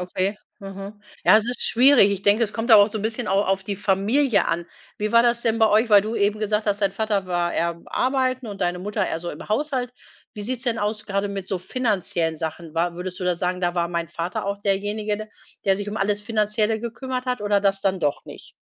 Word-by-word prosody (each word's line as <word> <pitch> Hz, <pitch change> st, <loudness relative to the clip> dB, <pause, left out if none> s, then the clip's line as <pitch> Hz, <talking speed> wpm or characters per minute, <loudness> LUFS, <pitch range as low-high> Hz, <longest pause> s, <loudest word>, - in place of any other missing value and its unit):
okay, 185 Hz, +3 st, -2 dB, 0.2 s
mhm. 195 Hz, +1 st, -9 dB, 0.2 s
Ja -, -, +7 dB
es 215 Hz, -, -2 dB
ist 245 Hz, -, -2 dB
schwierig. 245 Hz, -4 st, +6 dB
Ich 200 Hz, -1 st, -3 dB
denke 205 Hz, +3 st, +4 dB
es 215 Hz, -, -4 dB
kommt 225 Hz, +2 st, -4 dB
da 220 Hz, -, +10 dB
auch 205 Hz, 0 st, +6 dB
so 215 Hz, 0 st, -4 dB
'n -, -, -5 dB
bisschen 225 Hz, +2 st, -2 dB
au 195 Hz, +1 st, +3 dB
auf 195 Hz, -1 st, 0 dB
die 200 Hz, 0 st, -3 dB
Familie 210 Hz, +6 st, +2 dB
an. 170 Hz, +1 st, -2 dB, 0.3 s
Wie 210 Hz, +1 st, -2 dB
war 230 Hz, 0 st, +6 dB
das 235 Hz, 0 st, +2 dB
denn 225 Hz, -1 st, +1 dB
bei 220 Hz, -1 st, +5 dB
euch, 220 Hz, +3 st, +3 dB
weil 205 Hz, -2 st, +6 dB
du 215 Hz, +2 st, -4 dB
eben 205 Hz, 0 st, +1 dB
gesagt 210 Hz, 0 st, -1 dB
hast 205 Hz, 0 st, 0 dB
dein 195 Hz, -1 st, +2 dB
Vater 210 Hz, -2 st, -1 dB
war 175 Hz, -1 st, -1 dB
eher 170 Hz, 0 st, -1 dB
arbeiten 255 Hz, -1 st, 0 dB
und 200 Hz, -2 st, -8 dB
deine 175 Hz, 0 st, 0 dB
Mutter 205 Hz, +3 st, -2 dB
eher 165 Hz, -, -3 dB
so 175 Hz, -, -5 dB
im 150 Hz, -, -10 dB
Haushalt. 250 Hz, 0 st, -1 dB, 0.4 s
Wie 210 Hz, -, -6 dB
sieht's 245 Hz, +2 st, -3 dB
denn 230 Hz, -3 st, 0 dB
aus, 210 Hz, 0 st, -2 dB
gerade 200 Hz, 0 st, -1 dB
mit 195 Hz, -2 st, -6 dB
so 190 Hz, -, -1 dB
finanziellen 185 Hz, -6 st, -1 dB
Sachen? 160 Hz, 0 st, -6 dB
War 170 Hz, +1 st, 0 dB
würdest 180 Hz, +1 st, -6 dB
du 180 Hz, -, -3 dB
da 180 Hz, -1 st, +2 dB
sagen: 180 Hz, +1 st, -2 dB
„Da 175 Hz, 0 st, 0 dB
war 170 Hz, -1 st, 0 dB
mein 170 Hz, -1 st, -3 dB
Vater 170 Hz, +2 st, -4 dB
auch 200 Hz, 0 st, -2 dB
derjenige, 210 Hz, +2 st, -2 dB, 0.4 s
der 195 Hz, -1 st, +3 dB
sich 205 Hz, +1 st, -5 dB
um 210 Hz, -, -5 dB
alles 205 Hz, 0 st, 0 dB
Finanzielle 215 Hz, +1 st, 0 dB
gekümmert 255 Hz, +2 st, -4 dB
hat.“ 250 Hz, -3 st, -2 dB
oder 205 Hz, -1 st, +1 dB
das 195 Hz, -1 st, +2 dB
dann 190 Hz, -1 st, 0 dB
doch 145 Hz, -3 st, -1 dB
nicht? -, -, -11 dB
205 Hz, 240 wpm, -23 LUFS, 185-220 Hz, 0.4 s, da